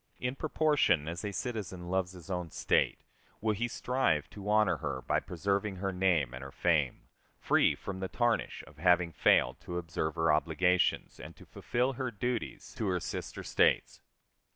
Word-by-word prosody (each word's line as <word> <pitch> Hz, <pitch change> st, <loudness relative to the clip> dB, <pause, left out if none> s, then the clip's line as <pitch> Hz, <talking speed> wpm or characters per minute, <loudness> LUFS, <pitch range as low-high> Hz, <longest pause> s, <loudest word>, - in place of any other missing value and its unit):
In 125 Hz, +1 st, -2 dB
proportion 150 Hz, -, +2 dB
as 85 Hz, +1 st, -4 dB
a 105 Hz, -, -2 dB
citizen 100 Hz, -6 st, -4 dB
loves 95 Hz, 0 st, -1 dB
his 90 Hz, +1 st, -10 dB
own 90 Hz, -2 st, -3 dB
State -, -, +1 dB, 0.4 s
will 110 Hz, 0 st, +1 dB
he 115 Hz, +4 st, -1 dB
strive 120 Hz, -, 0 dB
to 100 Hz, 0 st, -7 dB
honor 105 Hz, -1 st, +3 dB
her 65 Hz, -2 st, -4 dB
by -, -, +1 dB
preserving 100 Hz, +3 st, -2 dB
her 95 Hz, +1 st, -2 dB
name 90 Hz, -9 st, +2 dB
and 65 Hz, +1 st, -7 dB
her 70 Hz, -, -8 dB
fame, 75 Hz, -7 st, +1 dB, 0.4 s
free -, -, +3 dB
from 95 Hz, -1 st, -6 dB
the 95 Hz, -, -2 dB
tarnish 120 Hz, +2 st, 0 dB
of 75 Hz, -, -17 dB
having 90 Hz, 0 st, +3 dB
failed -, -, +3 dB
to 90 Hz, -, -6 dB
observe 80 Hz, -2 st, -3 dB
her 80 Hz, -2 st, +3 dB
obligations 90 Hz, +4 st, +1 dB
and -, -, -10 dB
to -, -, -15 dB
fulfill 125 Hz, +3 st, -1 dB
her 130 Hz, 0 st, -3 dB
duties 120 Hz, +2 st, -4 dB
to 110 Hz, -, 0 dB
her 90 Hz, -1 st, +1 dB
sister -, -, -5 dB
States. -, -, +2 dB
95 Hz, 175 wpm, -31 LUFS, 85-110 Hz, 0.4 s, honor